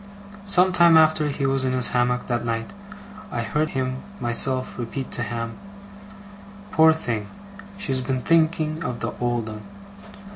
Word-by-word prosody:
Some 185 Hz, -1 st, +4 dB
time 170 Hz, -2 st, +6 dB
after 155 Hz, -1 st, +4 dB
he 140 Hz, -1 st, -2 dB
was 135 Hz, 0 st, 0 dB
in 130 Hz, -1 st, 0 dB
his 125 Hz, -1 st, +1 dB
hammock 125 Hz, 0 st, 0 dB
that 120 Hz, -1 st, -2 dB
night, 115 Hz, -1 st, -3 dB, 0.6 s
I 120 Hz, -, -3 dB
heard 150 Hz, +6 st, -1 dB
him 130 Hz, -1 st, -3 dB, 0.2 s
myself 130 Hz, +2 st, +2 dB
repeat 130 Hz, +3 st, -5 dB
to -, -, -3 dB
Ham, 115 Hz, 0 st, -4 dB, 1.1 s
'Poor 160 Hz, 0 st, +6 dB
thing! 115 Hz, -9 st, -3 dB, 0.5 s
She's 135 Hz, -10 st, -1 dB
been 130 Hz, -1 st, -2 dB
thinking 160 Hz, -1 st, +1 dB
of 125 Hz, -1 st, -4 dB
the -, -, -3 dB
old 120 Hz, -2 st, -1 dB
'un! 110 Hz, -1 st, -7 dB
130 Hz, 150 wpm, -23 LUFS, 120-155 Hz, 1.1 s, time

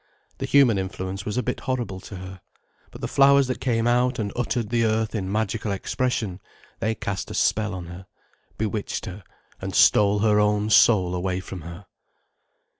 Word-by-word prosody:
The -, -, -3 dB
human 130 Hz, -8 st, +4 dB
influence 95 Hz, +1 st, -5 dB
was 105 Hz, +2 st, -3 dB
a 125 Hz, -, +1 dB
bit 125 Hz, -, -3 dB
horrible 120 Hz, -8 st, -3 dB
to 100 Hz, -, -10 dB
her. 95 Hz, 0 st, -9 dB, 0.5 s
But -, -, -12 dB
the -, -, -2 dB
flowers 140 Hz, 0 st, +5 dB
that 130 Hz, -2 st, -4 dB
came 115 Hz, -3 st, 0 dB
out 125 Hz, +1 st, +2 dB
and 100 Hz, -3 st, -3 dB
uttered 120 Hz, -2 st, -2 dB
the 115 Hz, 0 st, +1 dB
earth 110 Hz, -1 st, 0 dB
in 95 Hz, -4 st, -3 dB
magical 110 Hz, 0 st, -1 dB
expression, 100 Hz, -1 st, -2 dB, 0.4 s
they 110 Hz, 0 st, -1 dB
cast 95 Hz, -3 st, -4 dB
a -, -, -6 dB
spell 110 Hz, -3 st, +1 dB
on 90 Hz, -2 st, -6 dB
her, 90 Hz, +2 st, -10 dB, 0.5 s
bewitched 105 Hz, -1 st, -3 dB
her 95 Hz, +2 st, -8 dB, 0.4 s
and -, -, -5 dB
stole 105 Hz, 0 st, +5 dB
her 105 Hz, -1 st, +3 dB
own 105 Hz, +1 st, +1 dB
soul 95 Hz, -6 st, +5 dB
away 90 Hz, 0 st, -2 dB
from 95 Hz, -1 st, -8 dB
her. 85 Hz, +4 st, -10 dB
105 Hz, 180 wpm, -24 LUFS, 95-115 Hz, 0.5 s, flowers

